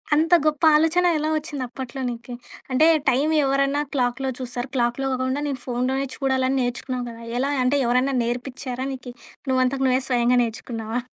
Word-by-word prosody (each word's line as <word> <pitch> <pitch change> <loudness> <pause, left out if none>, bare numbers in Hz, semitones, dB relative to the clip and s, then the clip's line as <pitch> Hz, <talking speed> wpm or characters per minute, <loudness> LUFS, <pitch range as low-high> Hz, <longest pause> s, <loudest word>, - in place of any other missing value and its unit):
అంత 325 +3 +2
గొప్ప 305 0 +1
ఆలోచన 325 +4 +3
ఎలా 305 +1 -1
ఒచ్చిందప్పట్లో 265 -3 -5
నీకు? 240 +1 -7 0.4
అంటే 305 +5 +5 0.2
టైం 275 +5 +2 0.2
ఎవరన్నా 275 +1 +1
క్లాక్‌లో 260 0 0
చూస్తారు. 245 0 -4
క్లాక్‌లో 240 +2 0
గాకుండా 260 +2 -1
నేను 275 -3 -3
ఫోనులోనే 255 +2 -1
చూడాలని 265 -1 +1
నేర్చుకున్నావు 245 +1 -3
గదా! 230 0 -10 0.2
ఎలా 275 +2 0
అంటే 260 +3 +2
ఎవరైనా 250 +3 +2
నేర్పిచ్చారా 250 +1 -4
నీకి? 255 -1 -8 0.4
నువ్వంతట 260 +1 +1
నువ్వే 255 0 +3
స్వయంగా 245 -1 +2
నేర్చుకున్నావా? 225 0 -4
260 Hz, 145 wpm, -23 LUFS, 245-275 Hz, 0.4 s, అంటే